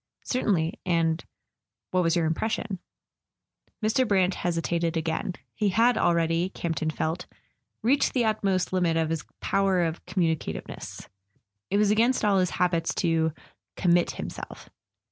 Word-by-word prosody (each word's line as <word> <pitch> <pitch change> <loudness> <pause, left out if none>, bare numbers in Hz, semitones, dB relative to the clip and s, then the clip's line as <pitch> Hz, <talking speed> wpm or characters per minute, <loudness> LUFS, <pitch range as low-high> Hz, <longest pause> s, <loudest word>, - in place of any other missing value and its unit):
"Certainly. 185 -10 0
And—what 160 - -2
was 165 -1 +2
your 170 -2 +2
impression?" 200 +4 -1 1.0
Mr. 235 +4 +2
Brant 190 -2 +3
hesitated 170 -1 -1
again. 160 +3 -2 0.2
He 210 -2 +1
had 230 +5 +4
already, 170 -2 +2
Camp 170 -4 -3
ton 155 - 0
felt, 160 +3 -2 0.6
reached 270 +5 +3
the 245 -3 +2
utmost 195 -4 0
limit 175 -3 +2
of 160 -1 +1
his 165 -1 -2 0.2
power 195 -2 +2
of 165 0 -3
com¬ 185 - 0
municativeness. 155 - -7 0.6
It 200 - +1
was 210 0 +4
against 230 +2 +3
all 200 -2 +4
his 180 -1 +2
habits 170 -2 0
to 165 -2 +2 0.5
"com¬ 175 -2 +3
mit 175 0 +3
himself." - - -8
175 Hz, 140 wpm, -27 LUFS, 165-200 Hz, 1.0 s, had